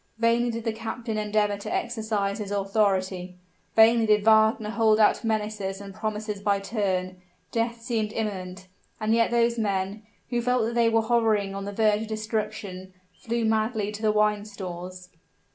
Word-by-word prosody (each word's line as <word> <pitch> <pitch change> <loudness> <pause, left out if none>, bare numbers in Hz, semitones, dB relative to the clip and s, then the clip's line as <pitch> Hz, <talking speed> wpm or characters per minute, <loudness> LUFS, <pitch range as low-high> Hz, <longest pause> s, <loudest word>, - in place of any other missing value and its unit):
Vainly 235 +1 +2
did 230 -1 -4
the 225 -1 -1
captain 225 +1 -5
endeavor 210 -1 +1
to 200 - -7
exercise 220 -3 -1
his 205 -2 -5
authority 195 -3 0 0.4
vainly 225 0 +6
did 210 -1 +4
Wagner 220 -1 +4
hold 220 -1 +3
out 215 - +4
menaces 210 -3 -2
and 200 -1 -9
promises 215 -1 -4
by 200 -1 +1
turns; 190 -3 -2 0.3
death 230 0 -1
seemed 225 -3 -1
imminent, 185 -4 -4 0.3
and 215 0 +1
yet 230 0 +3
those 235 0 +2
men, 200 0 -1 0.3
who 240 -1 +1
felt 250 -1 +1
that 230 - -2
they 235 -1 +3
were 225 0 +2
hovering 220 -4 +1
on 195 0 -5
the 200 - -4
verge 215 0 +2
of 220 - -5
destruction, 215 -4 -4 0.2
flew 235 0 -2
madly 220 -1 0
to 210 0 -8
the 215 -1 +3
wine 210 -1 +2
stores. 185 -3 -8
215 Hz, 165 wpm, -26 LUFS, 200-225 Hz, 0.4 s, vainly